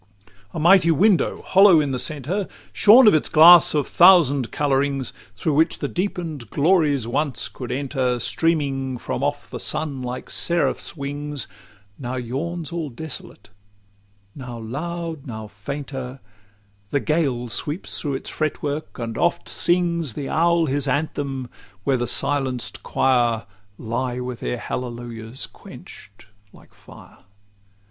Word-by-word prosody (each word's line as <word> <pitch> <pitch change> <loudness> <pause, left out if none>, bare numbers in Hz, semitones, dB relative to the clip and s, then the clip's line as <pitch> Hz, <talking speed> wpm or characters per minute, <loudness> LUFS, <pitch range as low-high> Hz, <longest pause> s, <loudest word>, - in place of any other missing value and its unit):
LXII 100 +2 -31 0.2
A - - -2
mighty 175 +1 +5
window, 185 +4 +2
hollow 190 -3 +6
in 145 -2 0
the 130 - -2
centre, 155 +8 -2 0.3
Shorn 235 +5 +7
of 210 - +7
its 155 - +1
glass 165 +1 +8
of 145 - 0
thousand 160 -9 +5
colourings, 140 -2 0 0.2
Through 150 +8 -1
which 160 +3 +2
the - - -3
deepen'd 170 - -4
glories 150 - +2
once 135 +3 -1
could 125 -2 -8
enter, 130 -2 -1
Streaming 135 -3 0
from 125 - -4
off 145 0 -3
the - - -5
sun 145 -4 -1
like 125 0 -6
seraph's 170 -1 0
wings, 145 -2 -4 0.5
Now 125 -1 -4
yawns 145 +7 -4
all 165 -3 -4
desolate: 135 -4 -8 0.8
now 125 -4 -8
loud, 160 +6 -5
now 110 -3 -6
fainter, 130 +4 -7 0.7
The 140 - 0
gale 140 -6 -1
sweeps 145 - -2
through 145 -3 -2
its - - -5
fretwork, 155 0 -3
and 115 -3 -5
oft 175 - 0
sings 170 -6 0
The 140 +2 -5
owl 170 +1 +2
his 140 -1 0
anthem, 140 -2 -2 0.4
where 135 +2 +1
the 120 0 -2
silenced 135 -4 -1
quire 120 -3 +1 0.3
Lie 120 +2 -3
with 125 -1 -5
their 125 - -3
hallelujahs 120 -1 -5
quench'd 100 +1 -14 0.3
like - - -19
fire. - - -16
140 Hz, 135 wpm, -22 LUFS, 125-160 Hz, 0.8 s, glass